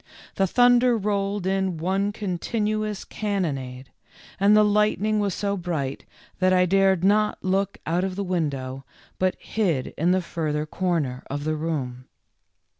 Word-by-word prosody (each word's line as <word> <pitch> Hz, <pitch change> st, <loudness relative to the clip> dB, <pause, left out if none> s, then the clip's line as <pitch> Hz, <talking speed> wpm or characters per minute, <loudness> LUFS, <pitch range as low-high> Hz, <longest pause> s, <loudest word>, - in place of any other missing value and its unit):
The 195 Hz, -, +1 dB
thunder 245 Hz, +2 st, +4 dB
rolled 200 Hz, -2 st, -1 dB
in 190 Hz, -2 st, 0 dB
one 190 Hz, +5 st, 0 dB
continuous 215 Hz, +1 st, -2 dB
cannonade, 135 Hz, -, -3 dB, 0.5 s
and 205 Hz, +2 st, +5 dB
the 210 Hz, -, +6 dB
lightning 210 Hz, 0 st, +2 dB
was 200 Hz, -3 st, 0 dB
so 200 Hz, -1 st, -1 dB
bright 160 Hz, -7 st, -3 dB, 0.3 s
that 185 Hz, 0 st, +3 dB
I 180 Hz, 0 st, +4 dB
dared 190 Hz, -1 st, +3 dB
not 210 Hz, +2 st, +3 dB
look 195 Hz, +1 st, 0 dB
out 170 Hz, +3 st, 0 dB
of 190 Hz, -1 st, -2 dB
the 200 Hz, -, -2 dB
win 175 Hz, -5 st, 0 dB
dow, 130 Hz, -1 st, -6 dB, 0.4 s
but 185 Hz, 0 st, +1 dB
hid 170 Hz, -12 st, -1 dB
in 165 Hz, +3 st, +2 dB
the 185 Hz, -, +3 dB
further 155 Hz, -3 st, -2 dB
corner 155 Hz, -7 st, -1 dB
of 145 Hz, +1 st, -3 dB
the 155 Hz, +1 st, -1 dB
room. 135 Hz, -6 st, -3 dB
185 Hz, 150 wpm, -24 LUFS, 155-205 Hz, 0.5 s, the